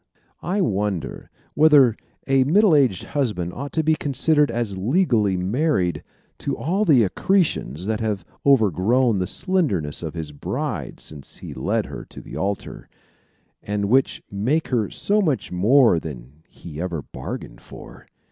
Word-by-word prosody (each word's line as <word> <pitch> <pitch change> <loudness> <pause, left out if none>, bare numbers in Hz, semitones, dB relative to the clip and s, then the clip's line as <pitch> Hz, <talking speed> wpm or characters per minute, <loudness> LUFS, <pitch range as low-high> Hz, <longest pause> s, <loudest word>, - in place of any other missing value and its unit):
I 195 +4 -1
wonder 100 - -2 0.2
whether 145 -6 +6 0.3
a 135 -1 +3
middle 190 +7 +4
aged 130 - +2
husband 105 -12 -2
ought 140 +2 -6
to 160 - +1
be 160 +1 +3
considered 150 +1 +2
as 115 -4 -2
legally 110 - +1
married 95 - 0 0.4
to - - -3
all 190 +7 0
the 140 - +5
accretions 100 - 0
that 110 +1 -1
have 105 -6 -2 0.2
overgrown 115 - +3
the 90 - -1
slenderness 115 - 0
of 80 -1 -6
his 80 -3 -5
bride, 70 - -4
since 75 -3 -8
he - - -8
led - - -1
her - - -8
to - - -12
the - - -10
altar, 100 +1 -4 0.7
and 105 0 -2
which 130 +3 +2
make 125 +11 0
her 115 -6 0
so 210 +1 0
much 155 -9 -1
more 110 +1 +4
than 70 -1 -10
he 80 -2 -9
ever 85 -5 -3
bargained - - -8
for! - - -13
110 Hz, 145 wpm, -22 LUFS, 90-145 Hz, 0.7 s, whether